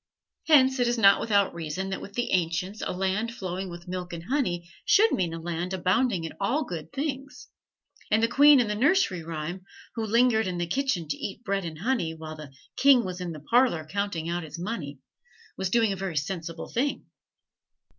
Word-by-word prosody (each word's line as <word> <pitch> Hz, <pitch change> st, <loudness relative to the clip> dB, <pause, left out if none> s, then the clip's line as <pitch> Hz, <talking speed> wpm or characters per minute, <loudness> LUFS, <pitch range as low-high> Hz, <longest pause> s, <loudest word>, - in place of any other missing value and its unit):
Hence 265 Hz, -4 st, +5 dB
it 245 Hz, -, +3 dB
is 240 Hz, 0 st, +1 dB
not 200 Hz, -3 st, +6 dB
without 200 Hz, -3 st, +2 dB
reason 170 Hz, +3 st, -4 dB
that 190 Hz, -, -3 dB
with 200 Hz, -, -9 dB
the 240 Hz, +2 st, -2 dB
ancients 180 Hz, +3 st, -1 dB
a -, -, -2 dB
land 195 Hz, +5 st, -1 dB
flowing 185 Hz, -2 st, -4 dB
with 175 Hz, +1 st, -10 dB
milk 180 Hz, -1 st, -5 dB
and 165 Hz, -1 st, -6 dB
honey 180 Hz, -8 st, -1 dB, 0.2 s
should 435 Hz, +3 st, +5 dB
mean 175 Hz, -3 st, 0 dB
a 165 Hz, -, -5 dB
land 175 Hz, +2 st, -3 dB
abounding 185 Hz, +1 st, +1 dB
in 165 Hz, -, -5 dB
all 260 Hz, +10 st, +1 dB
good 165 Hz, -6 st, -7 dB
things; 280 Hz, 0 st, -5 dB, 0.6 s
and 220 Hz, +1 st, +3 dB
the -, -, +5 dB
queen 285 Hz, +3 st, +7 dB
in 240 Hz, -, +2 dB
the 210 Hz, -, -1 dB
nursery 260 Hz, -, +2 dB
rhyme, 165 Hz, +3 st, -5 dB, 0.3 s
who 225 Hz, -, -3 dB
lingered 220 Hz, -1 st, +3 dB
in 180 Hz, -1 st, -3 dB
the 175 Hz, -, -1 dB
kitchen 185 Hz, -, -1 dB
to 145 Hz, -, -3 dB
eat 200 Hz, +3 st, -6 dB
"bread 195 Hz, -3 st, -1 dB
and 160 Hz, -2 st, -6 dB
honey" 205 Hz, -9 st, 0 dB
while 155 Hz, 0 st, -8 dB
the 150 Hz, -3 st, -10 dB, 0.3 s
"king 270 Hz, -4 st, +5 dB
was 180 Hz, 0 st, -5 dB
in 175 Hz, -1 st, -4 dB
the 155 Hz, -2 st, -8 dB
parlor 230 Hz, -, +2 dB
counting 185 Hz, -1 st, -3 dB
out 175 Hz, +1 st, -2 dB
his 155 Hz, -1 st, -8 dB
money," 170 Hz, -7 st, -5 dB, 0.6 s
was 190 Hz, -1 st, -2 dB
doing 225 Hz, -1 st, +2 dB
a -, -, -6 dB
very 185 Hz, -4 st, -4 dB
sensible 165 Hz, +2 st, -4 dB
thing. 275 Hz, +4 st, -1 dB
190 Hz, 200 wpm, -27 LUFS, 170-235 Hz, 0.6 s, queen